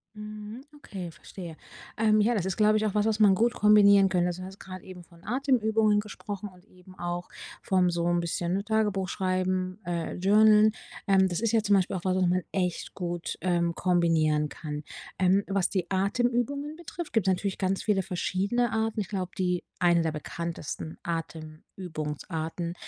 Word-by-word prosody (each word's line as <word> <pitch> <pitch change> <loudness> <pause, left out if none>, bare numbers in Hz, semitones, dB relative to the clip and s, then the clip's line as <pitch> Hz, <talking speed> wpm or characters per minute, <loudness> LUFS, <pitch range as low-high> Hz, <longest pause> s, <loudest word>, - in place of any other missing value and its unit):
Mhm. 210 +2 -8
Okay, 190 -11 -7
verstehe. 170 -1 -10 0.4
Ähm, 215 -1 +4
ja, 235 +3 +2
das 195 -5 -1
ist, 190 -1 -1
glaube 215 0 +4
ich, 215 - 0
auch 210 - -1
was, 210 0 +2
was 220 -1 0
man 205 -3 +6
gut 235 +5 +2
kombinieren 200 -2 +6
könnte. 180 -1 +1
Also, 180 +1 -4
du - - -6
hast 195 +1 -12
gerade 185 -1 -9
eben 180 -1 -10
von 170 0 -20
Atemübungen 220 -3 +2
gesprochen 205 -1 -6
und 180 0 -20
eben 185 -1 -18
auch 175 0 -4 0.3
vom 185 -2 +2
so 170 -1 -1
'n 175 0 +2
bisschen 175 +3 -1
Tagebuch 210 -3 0
schreiben, 185 0 -1
äh, 170 -1 -3
journalen, 210 +3 +5 0.4
ähm, 190 -1 +5
das 175 -2 -2
ist 230 -1 0
ja 225 -2 +2
zum 205 -1 +4
Beispiel 190 0 +1
auch 180 - -5
was, 185 -1 +2
was 185 -1 +2
man 180 0 +1
echt 180 -3 -2
gut, 175 -2 -4
ähm, 170 -2 +1
kombinieren 160 -4 +2
kann. 150 -1 -6 0.3
Ähm, 190 +2 +3
was 195 -2 +1
die 185 -3 -2
Atemübungen 245 +9 0
betrifft, 340 0 -7
gibt 225 -5 +2
natürlich 190 +1 0
ganz 190 0 0
viele 200 -3 +1
verschiedene 200 +7 -1
Arten. 220 0 -1
Ich 195 - -5
glaube, 185 -3 -4
die 180 -1 0 0.2
eine 175 -1 +4
der 160 -1 0
bekanntesten 160 0 -5
Atemübungsarten 160 0 -5
190 Hz, 180 wpm, -28 LUFS, 175-210 Hz, 0.4 s, man